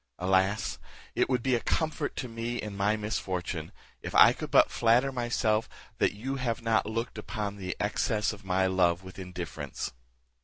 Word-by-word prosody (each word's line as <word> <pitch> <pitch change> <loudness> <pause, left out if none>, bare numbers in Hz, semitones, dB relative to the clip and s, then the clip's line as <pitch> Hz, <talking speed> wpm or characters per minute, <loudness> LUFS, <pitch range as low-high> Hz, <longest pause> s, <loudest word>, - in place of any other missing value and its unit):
Alas! 95 +3 +1 0.3
it - - +1
would 125 -3 +1
be 130 - +2
a 120 - +3
comfort 155 +2 -1
to 125 - -3
me 115 +1 -4
in 105 -2 -5
my 100 +2 +2
misfortune, 90 -6 -3 0.3
if - - -6
I - - +9
could - - -6
but - - +5
flatter 120 +4 +3
myself, 120 -3 0 0.3
that - - +3
you 135 +6 -3
have 120 -3 -2
not 115 -2 +2
looked 115 0 -3
upon 105 -1 -4
the 90 -2 -4
excess 105 0 0
of 105 -1 -12
my 95 0 +1
love 90 -1 +2
with 95 +1 -10
indifference." 85 -8 -5
105 Hz, 170 wpm, -29 LUFS, 95-115 Hz, 0.3 s, I